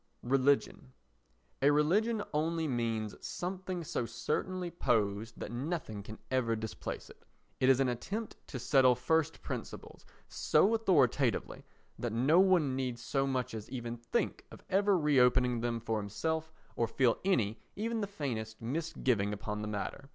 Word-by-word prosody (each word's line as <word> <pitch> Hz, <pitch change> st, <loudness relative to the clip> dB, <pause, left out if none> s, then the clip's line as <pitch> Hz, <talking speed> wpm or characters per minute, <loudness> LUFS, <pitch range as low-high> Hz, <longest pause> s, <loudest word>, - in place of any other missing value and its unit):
Religion 135 Hz, 0 st, +1 dB, 0.7 s
A 140 Hz, -, +6 dB
religion 205 Hz, +10 st, +2 dB
only 160 Hz, +1 st, 0 dB
means 115 Hz, -4 st, -1 dB
something 185 Hz, -1 st, -4 dB
so 140 Hz, -, -2 dB
certainly 180 Hz, +8 st, -2 dB
posed 110 Hz, -, 0 dB
that -, -, -5 dB
nothing 125 Hz, -4 st, -3 dB
can 110 Hz, +2 st, -9 dB
ever 120 Hz, -3 st, +2 dB
displace 110 Hz, 0 st, -5 dB
it. -, -, -16 dB, 0.4 s
It 130 Hz, -, +4 dB
is 135 Hz, -1 st, +5 dB
an 135 Hz, -, +3 dB
attempt 200 Hz, -, -4 dB
to 135 Hz, -, -5 dB
settle 130 Hz, 0 st, +4 dB
first 160 Hz, +5 st, 0 dB
principles -, -, -7 dB, 0.2 s
so 210 Hz, -, +3 dB
authoritatively 145 Hz, -, +2 dB, 0.4 s
that 120 Hz, -2 st, -2 dB
no 135 Hz, +9 st, +4 dB
one 180 Hz, -8 st, +4 dB
need 130 Hz, -2 st, -2 dB
so 135 Hz, +3 st, -1 dB
much 130 Hz, -3 st, -1 dB
as 110 Hz, -2 st, -6 dB
even 120 Hz, -2 st, -4 dB
think 120 Hz, 0 st, -2 dB
of -, -, -13 dB
ever 200 Hz, 0 st, +4 dB
re 150 Hz, -4 st, +3 dB
opening 125 Hz, -1 st, +4 dB
them 120 Hz, -1 st, -1 dB
for 110 Hz, -1 st, -1 dB
himself 160 Hz, +10 st, -2 dB, 0.2 s
or 115 Hz, -, +1 dB
feel 125 Hz, 0 st, +2 dB
any, 115 Hz, -, +1 dB, 0.2 s
even 225 Hz, +2 st, -2 dB
the 205 Hz, -, -1 dB
faintest, 120 Hz, -, -4 dB
misgiving 125 Hz, -6 st, 0 dB
upon 105 Hz, 0 st, -4 dB
the 105 Hz, -, -3 dB
matter. 105 Hz, +6 st, -4 dB
130 Hz, 150 wpm, -32 LUFS, 115-165 Hz, 0.7 s, A